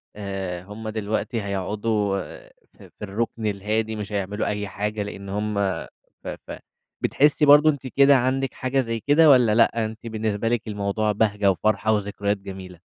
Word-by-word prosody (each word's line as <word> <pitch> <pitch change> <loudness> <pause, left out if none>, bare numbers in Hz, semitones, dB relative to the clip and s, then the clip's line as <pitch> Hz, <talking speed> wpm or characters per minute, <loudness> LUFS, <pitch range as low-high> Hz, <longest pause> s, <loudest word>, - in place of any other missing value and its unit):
آآ 95 -3 -5
هُم 110 +3 -7
دلوقتي 110 +1 -2
هيقعدوا 100 0 -1 0.5
ف - - -33 0.2
في - - -4
الركن 110 +2 -3
الهادي، 110 +2 -1
مش 105 -1 -6
هيعملوا 100 +1 -2
أي 105 -1 -2
حاجة 105 +2 -3
لأن 100 -1 -8
هُم 105 +1 -2 0.6
ف - - -9 0.2
فبتحسي 150 +1 -1
برضه 150 +2 +7
أنتِ 140 -3 -2
كده 140 +2 +5
عندِك 130 +1 0
حاجة 130 +1 -1
زي 115 -3 -1
كده، 150 +6 +5
والّا 125 -6 +5
لأ 115 -1 +3
أنتِ 110 +1 -7
بالنسبة 110 -1 -2
لِك 120 -1 -1
الموضوع 105 +1 -1
بهجة 105 -1 +2
وفرحة 110 +3 +1
وذكريات 100 0 -1
جميلة؟ 95 -3 -10
105 Hz, 155 wpm, -24 LUFS, 100-115 Hz, 0.6 s, برضه